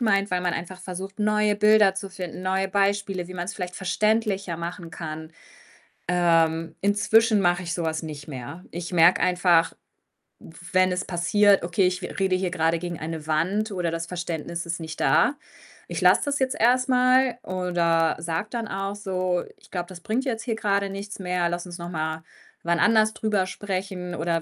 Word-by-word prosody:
meint, 200 -3 +2
weil 180 - +1
man 180 -1 -1
einfach 180 +2 -6
versucht, 190 +2 -7
neue 210 0 +2
Bilder 210 -1 +5
zu 195 0 -5
finden, 185 -2 -7
neue 190 +1 0
Beispiele, 195 -2 0
wie 185 - -8
man's 180 +2 -4
vielleicht 180 -2 -5
verständlicher 200 -1 0
machen 170 0 -6
kann. 160 -1 -7 0.8
Ähm, 165 -2 +2
inzwischen 210 +2 +3
mache 175 0 +2
ich 170 - -3
so 175 - -2
was 160 -1 -1
nicht 150 -2 -7
mehr. 145 +6 -7
Ich 175 +1 -6
merke 170 +1 +5
einfach, 175 -2 +3 0.7
w - - -14 0.2
wenn 185 0 +4
es 180 +1 -2
passiert: 195 +3 +3
„Okay, 180 +2 +2
ich 180 +1 -2
re - - -6
rede 190 -1 +2
hier 185 -1 -1
grade 165 0 +1
gegen 175 -1 -5
eine 160 -1 -5
Wand 185 +8 0
oder 180 -3 -1
das 165 0 -3
Verständnis 170 -1 -4
ist 170 0 -3
nicht 160 -1 -7
da. 280 +4 +3 0.5
Ich - - -4
lasse - - +5
das 285 0 0
jetzt 260 -1 0
erst 255 +2 +3
mal.“, 255 -1 +3
oder 175 -4 +1
sage 165 +5 -3
dann 230 -2 -3
auch 195 0 -3
so: 185 -3 -1
„Ich - - -22
glaube, 175 -2 -3
das 180 -2 -10
bringt 225 +8 -1
jetzt 230 -5 -3
hier 230 -3 -2
grade 200 -2 0
nichts 200 +1 -6
mehr. 180 -2 -1
Lass 175 +1 -3
uns 175 0 -9
noch 170 0 -6
mal 160 -1 -3 0.4
wann 170 0 0
anders 220 -1 +4
drüber 210 -4 0
sprechen 185 -2 -4
oder 165 0 -1
185 Hz, 185 wpm, -25 LUFS, 170-205 Hz, 0.8 s, Bilder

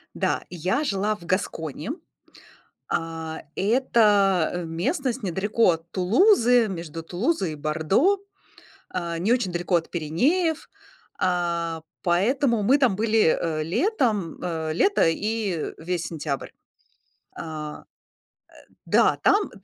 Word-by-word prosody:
Да, - - -1
я 180 - -1
жила 205 -1 0
в 175 - -14
Гасконе. 165 - -3 1.0
А, 160 -1 -4
это 200 -6 +2
местность 245 - -2
недалеко 200 +3 +2
от 165 0 -5
Тулузы, 240 - +4
между 170 -4 -6
Тулузой 185 - -1
и - - -6
Бордо. 160 - +1 0.7
Э, 170 -2 -3
не 185 +7 0
очень 240 -7 0
далеко 175 +1 0
от 165 -1 0
Пиренеев, 285 - 0 0.5
э, 170 -2 -1 0.2
поэтому 230 +7 +2
мы 260 +8 +5
там 260 -8 +2
были, 215 -4 +3
э, 155 -2 -1
летом, 215 - 0
э, 160 -3 -2
лето 395 - +3
и 200 -1 -2
весь 175 +1 -3
сентябрь. 150 -4 -4 0.9
Э 155 -2 -6 0.9
Э, - - -27
да. - - +3
Там 410 -1 +3
185 Hz, 115 wpm, -24 LUFS, 165-230 Hz, 1.0 s, мы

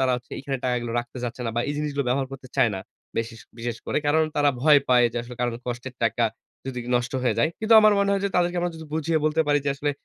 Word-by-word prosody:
তারা 130 -1 +3
হচ্ছে 120 - -12
এখানে 135 0 -3
টাকাগুলো 120 -2 -1
রাখতে 120 +2 -5
চাচ্ছে 120 +1 -5
না - - -1
বা - - +3
এই - - 0
জিনিসগুলো 145 -2 -1
ব্যবহার 135 +2 +1
করতে 135 -1 -9
চায় 115 - +5
না। 95 - -4 0.4
বেশিস 115 0 -3 0.2
বিশেষ 115 0 -3
করে। - - +1
কারণ 155 +2 +4
তারা 145 -1 +4
ভয় 150 +1 +7
পায় 125 -1 +5
যে - - -6
আসলে 120 +1 -9
কারন 120 -1 0
কষ্টের 125 +1 -5
টাকা 115 +1 +2 0.4
যদি 125 -2 -4 0.2
নষ্ট 120 0 -2
হয়ে 125 - +2
যায়। - - +4
কিন্তু 220 +1 +4
আমার 215 0 +6
মনে 200 0 +2
হয় 200 - +1
যে - - +2
তাদেরকে 175 0 +2
আমরা 175 0 -1
যদি 160 -1 -9
বুঝিয়ে 160 +1 +1
বলতে 155 +1 +2
পারি 145 0 +3
যে - - 0
আসলে 145 +1 -1
135 Hz, 255 wpm, -25 LUFS, 120-155 Hz, 0.4 s, ভয়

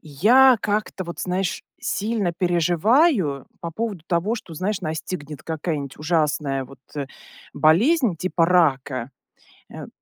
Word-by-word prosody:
Я 235 - +5
как-то, 210 -2 -2
вот 170 0 -7
знаешь, 185 +1 -2 0.2
сильно 205 -4 -1
переживаю 175 - +2
по 170 - -5
поводу 205 -1 -4
того, 180 +6 0
что, 185 -8 -9
знаешь, 190 +5 -2
настигнет 155 -2 -5
какая-нибудь 155 -4 -4
ужасная 150 -4 0
вот, 135 0 -15 0.2
э, 140 -2 -3 0.5
болезнь 215 - +3
типа 170 0 +1
рака. 140 -7 +1 0.6
Э, - - -8
170 Hz, 120 wpm, -23 LUFS, 150-205 Hz, 0.6 s, Я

